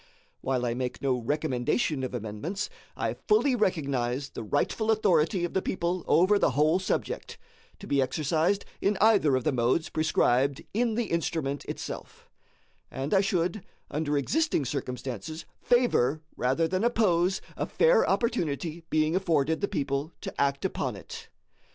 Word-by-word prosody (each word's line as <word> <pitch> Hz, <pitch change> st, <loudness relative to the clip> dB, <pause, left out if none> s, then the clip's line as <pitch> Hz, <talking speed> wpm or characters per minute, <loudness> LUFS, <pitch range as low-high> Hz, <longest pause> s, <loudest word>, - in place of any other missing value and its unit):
While 130 Hz, -2 st, -1 dB
I 120 Hz, -, 0 dB
make 125 Hz, +1 st, -4 dB
no 135 Hz, -2 st, +2 dB
recommendation 130 Hz, +1 st, 0 dB
of 130 Hz, -1 st, -3 dB
amendments, 120 Hz, -, -4 dB, 0.3 s
I -, -, -1 dB
fully 240 Hz, +5 st, +4 dB
recognize 140 Hz, -, 0 dB
the -, -, -7 dB
rightful 145 Hz, -, -1 dB
authority 185 Hz, -4 st, +3 dB
of 175 Hz, -, -6 dB
the 190 Hz, -, +1 dB
people 175 Hz, -1 st, -2 dB
over 195 Hz, +4 st, +4 dB
the -, -, +3 dB
whole 155 Hz, +4 st, +4 dB
subject, 190 Hz, -, -3 dB, 0.4 s
to 200 Hz, -, -11 dB
be 140 Hz, -7 st, +2 dB
exercised 155 Hz, +8 st, 0 dB, 0.2 s
in 200 Hz, 0 st, +1 dB
either 200 Hz, -10 st, +4 dB
of 130 Hz, -, 0 dB
the 155 Hz, -, +2 dB
modes 130 Hz, +5 st, +1 dB
prescribed 140 Hz, -3 st, +1 dB
in 230 Hz, +1 st, +1 dB
the 235 Hz, -1 st, -2 dB
instrument 160 Hz, -4 st, -1 dB
itself; -, -, -7 dB, 0.6 s
and 135 Hz, +6 st, -3 dB
I 195 Hz, -, +5 dB
should, 185 Hz, 0 st, 0 dB, 0.3 s
under 150 Hz, -1 st, 0 dB
existing 285 Hz, -, +1 dB
circumstances, 130 Hz, +1 st, -5 dB, 0.2 s
favor 160 Hz, -, +2 dB
rather 135 Hz, +7 st, +1 dB
than 185 Hz, +4 st, -1 dB
oppose 190 Hz, -6 st, +2 dB, 0.2 s
a -, -, -2 dB
fair -, -, +4 dB
opportunity 165 Hz, -, -1 dB
being 155 Hz, +1 st, +2 dB
afforded 160 Hz, -4 st, +1 dB
the 200 Hz, -, +1 dB
people 145 Hz, -3 st, -2 dB
to -, -, -5 dB
act 140 Hz, 0 st, +1 dB
upon -, -, -2 dB
it. -, -, -10 dB
155 Hz, 150 wpm, -28 LUFS, 135-190 Hz, 0.6 s, I